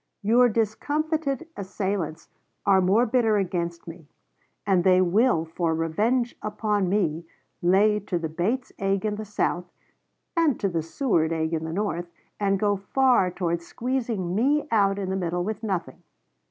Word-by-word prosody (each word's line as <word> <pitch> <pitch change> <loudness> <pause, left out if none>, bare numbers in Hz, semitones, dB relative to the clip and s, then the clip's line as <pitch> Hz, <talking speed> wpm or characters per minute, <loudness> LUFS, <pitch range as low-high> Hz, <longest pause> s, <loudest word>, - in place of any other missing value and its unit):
Your 240 +4 +5
discomfited 290 +8 -1
assailants 190 -4 -3 0.4
are 195 -2 +5
most 215 +6 +3
bitter 225 -4 +3
against 170 -3 -2
me; 165 -2 -10 0.6
and 190 -4 +3
they 185 0 +5
will 185 -1 +3
for 165 0 -1
revenge 220 +10 0
upon 210 -2 -1
me, 170 -5 0 0.3
lay 205 +4 +4
to 190 -3 -3
the 165 -1 -3
Bates 200 +11 -2
egg 195 0 0
in 210 -1 -1
the 215 - -5
South, 185 -3 -1 0.7
and 325 -7 +2
to 195 - 0
the 170 -2 -1
Seward 165 - 0
egg 160 0 -1
in 160 0 -1
the 160 - -4
North, 175 -2 -2 0.3
and 195 -1 +1
go 205 -1 +1
far 245 0 +2
towards 170 -2 -3
squeezing 230 -8 -2
me 280 +9 +2
out 200 -3 +3
in 190 -2 -3
the - - -1
middle 175 -1 -1
with 215 +3 -4
nothing. 190 -5 -3
195 Hz, 155 wpm, -25 LUFS, 175-225 Hz, 0.7 s, Your